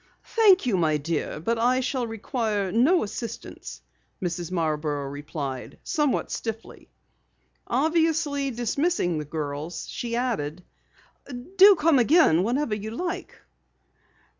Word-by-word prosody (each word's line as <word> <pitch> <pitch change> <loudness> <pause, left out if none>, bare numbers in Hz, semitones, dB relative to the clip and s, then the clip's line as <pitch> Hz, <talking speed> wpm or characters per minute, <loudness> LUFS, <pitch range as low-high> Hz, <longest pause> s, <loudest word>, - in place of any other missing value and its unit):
"Thank 410 - +6
you, 225 -6 +1
my 155 -3 +2
dear, 150 0 -3
but 225 +8 -1
I 250 +2 +3
shall 255 -1 -1
require 220 -3 -2
no 280 - +3
assistance," 225 +2 -7 0.4
Mrs. 175 -1 -3
Marborough 150 -4 -1
replied 140 -2 -6
somewhat 300 -5 0
stiffly. 225 -1 -6 0.8
Obviously 300 0 +1
dismissing 240 - 0
the 150 - -5
girls, 150 +2 -5
she 235 -1 -4
added: 185 - -2 0.9
"Do 390 +1 +9
come 310 -4 +3
again 245 - +5
whenever 245 +4 0
you 210 +1 -4
like." 345 +10 -5
225 Hz, 115 wpm, -25 LUFS, -, 0.9 s, Do